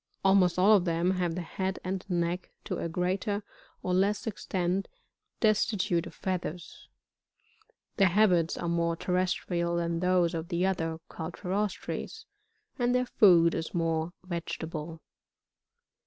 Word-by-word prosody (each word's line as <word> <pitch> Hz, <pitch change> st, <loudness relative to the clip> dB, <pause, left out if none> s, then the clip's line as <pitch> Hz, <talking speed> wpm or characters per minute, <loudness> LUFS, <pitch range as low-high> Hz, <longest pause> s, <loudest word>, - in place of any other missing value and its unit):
Almost 190 Hz, -2 st, +4 dB
all 200 Hz, +4 st, +6 dB
of 185 Hz, -3 st, +2 dB
them 170 Hz, +1 st, +1 dB
have 180 Hz, -3 st, -1 dB
the 180 Hz, -, -3 dB
head 190 Hz, +3 st, -3 dB
and 185 Hz, 0 st, -3 dB
neck, 175 Hz, 0 st, -1 dB, 0.2 s
to -, -, -3 dB
a 170 Hz, -, -2 dB
greater 185 Hz, +4 st, -1 dB, 0.4 s
or 180 Hz, -, 0 dB
Ies9 195 Hz, +3 st, +1 dB
extent, 185 Hz, -3 st, -1 dB, 0.5 s
destitute 205 Hz, -5 st, +2 dB
of -, -, -12 dB
feathers; 180 Hz, -2 st, -5 dB, 1.1 s
their 195 Hz, -3 st, +5 dB
habits 180 Hz, -4 st, +3 dB
are 170 Hz, -, -3 dB
more 170 Hz, 0 st, +1 dB
terrestrial 180 Hz, -1 st, -1 dB
than 170 Hz, -1 st, -1 dB
those 180 Hz, -1 st, +2 dB
of 165 Hz, 0 st, -3 dB
the 175 Hz, 0 st, 0 dB
other 165 Hz, -4 st, -1 dB
Cuitriroatres, 185 Hz, +5 st, -4 dB, 0.5 s
and 245 Hz, 0 st, +2 dB
their 250 Hz, 0 st, +2 dB
food 175 Hz, -8 st, +5 dB
is 160 Hz, -, -4 dB
more 165 Hz, 0 st, 0 dB
vegetable. 165 Hz, -2 st, -5 dB
180 Hz, 130 wpm, -29 LUFS, 170-190 Hz, 1.1 s, all